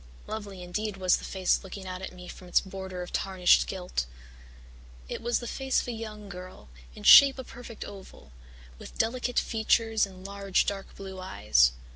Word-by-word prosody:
Lovely 200 Hz, -4 st, -6 dB
indeed 205 Hz, +3 st, -3 dB
was 185 Hz, -2 st, +3 dB
the -, -, -10 dB
face 190 Hz, 0 st, 0 dB
looking 190 Hz, 0 st, -8 dB
out 185 Hz, 0 st, -6 dB
at 190 Hz, -, -6 dB
me 180 Hz, 0 st, -11 dB
from 180 Hz, -, -11 dB
its 175 Hz, -, +4 dB
border 190 Hz, -1 st, -6 dB
of 175 Hz, -, -10 dB
tarnished 185 Hz, -2 st, +3 dB
gilt. 180 Hz, -, -3 dB, 1.0 s
It -, -, -5 dB
was 240 Hz, 0 st, +1 dB
the 240 Hz, -, -6 dB
face 265 Hz, +2 st, 0 dB
of -, -, -5 dB
a -, -, -1 dB
young 215 Hz, -2 st, -7 dB
girl, 180 Hz, -, -10 dB, 0.3 s
in -, -, -11 dB
shape 275 Hz, -1 st, +9 dB
a 260 Hz, -, -5 dB
perfect 235 Hz, -2 st, -9 dB
oval, 190 Hz, -, -12 dB, 0.5 s
with -, -, -11 dB
delicate 245 Hz, +2 st, -1 dB
features 225 Hz, -1 st, +2 dB
and 185 Hz, -1 st, -13 dB
large 200 Hz, -1 st, 0 dB
dark 195 Hz, -1 st, -4 dB
blue 190 Hz, -1 st, -8 dB
eyes. 65 Hz, -, +3 dB
195 Hz, 180 wpm, -28 LUFS, 185-220 Hz, 1.0 s, shape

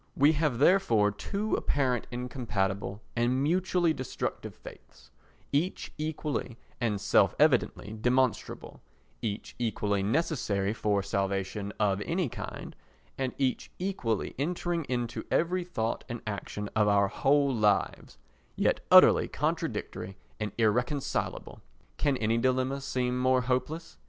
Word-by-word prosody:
We 145 Hz, +3 st, +5 dB
have 150 Hz, -5 st, 0 dB
therefore 120 Hz, -, +4 dB
two 200 Hz, -, -3 dB
apparently 130 Hz, -4 st, 0 dB
incompatible 105 Hz, -5 st, -2 dB
and 125 Hz, +3 st, +1 dB
mutually 175 Hz, +1 st, +2 dB
destructive 130 Hz, -4 st, -4 dB
faiths, -, -, -14 dB, 0.4 s
each 160 Hz, +7 st, -1 dB
equally 150 Hz, -5 st, -3 dB, 0.2 s
and 110 Hz, -5 st, 0 dB
self -, -, +3 dB
evidently 105 Hz, -, +2 dB
demonstrable, 125 Hz, 0 st, 0 dB, 0.4 s
each 105 Hz, -2 st, -4 dB
equally 105 Hz, -3 st, 0 dB
necessary 105 Hz, -, 0 dB
for 105 Hz, -3 st, 0 dB
salvation 100 Hz, +1 st, -2 dB
of 100 Hz, -2 st, +2 dB
any 170 Hz, -, -1 dB
kind, -, -, -7 dB, 0.4 s
and 130 Hz, -2 st, -2 dB
each 130 Hz, -2 st, -1 dB
equally 150 Hz, -, -2 dB
entering 170 Hz, +1 st, -1 dB
into 120 Hz, -3 st, -3 dB
every 180 Hz, +2 st, +1 dB
thought 115 Hz, -11 st, -2 dB
and 120 Hz, -1 st, -5 dB
action 105 Hz, 0 st, -4 dB
of 105 Hz, -1 st, +3 dB
our 100 Hz, -1 st, +4 dB
whole 140 Hz, +5 st, +2 dB
lives, 105 Hz, -4 st, 0 dB, 0.4 s
yet -, -, +2 dB
utterly -, -, +8 dB
contradictory 95 Hz, +1 st, -3 dB, 0.2 s
and 105 Hz, -2 st, -2 dB
irreconcilable. 120 Hz, +5 st, -1 dB, 0.4 s
Can 140 Hz, -3 st, +1 dB
any 115 Hz, 0 st, +1 dB
dilemma 130 Hz, +2 st, +1 dB
seem 125 Hz, -2 st, -1 dB
more 130 Hz, 0 st, +3 dB
hopeless? 130 Hz, +7 st, -2 dB
125 Hz, 120 wpm, -29 LUFS, 105-145 Hz, 0.4 s, utterly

